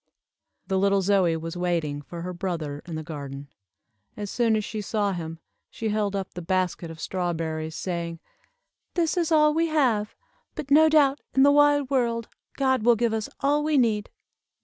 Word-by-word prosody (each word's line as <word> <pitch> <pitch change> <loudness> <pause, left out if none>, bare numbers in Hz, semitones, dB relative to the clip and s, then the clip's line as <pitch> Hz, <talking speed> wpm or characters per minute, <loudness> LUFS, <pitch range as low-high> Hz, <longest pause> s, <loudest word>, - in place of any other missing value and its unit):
The 190 0 0
little 195 0 +3
Zoie 180 -4 +2
was 165 +1 -6
waiting 170 -5 -1
for 170 +5 -8
her 180 +1 -4
brother 165 -6 -4
in 165 - -5
the 155 - -4
garden. 140 -3 -7 0.7
As 205 -2 -5
soon 230 -2 +2
as 215 -1 -1
she 215 -1 -4
saw 205 0 0
him, 165 -3 -5 0.3
she 225 - -4
held 210 -1 0
up 195 -1 -4
the 180 - -6
basket 180 -1 -1
of 165 -1 -10
strawberries, 160 -3 -3
saying, 170 -2 -4 0.8
"This 340 -1 +1
is 340 -2 0
all 300 -1 +5
we 330 +1 +2
have, 250 -9 +1 0.4
but, 280 - -6
no 315 +2 +7
doubt 290 -2 +4
in 265 - +6
the 285 - +7
wide 290 -1 +4
world, 235 -3 0 0.3
God 260 -2 +2
will 240 +2 +5
give 230 0 0
us 220 -1 -2
all 290 +2 +2
we 305 -1 +2
need." 220 -5 +1
205 Hz, 180 wpm, -25 LUFS, 170-265 Hz, 0.8 s, no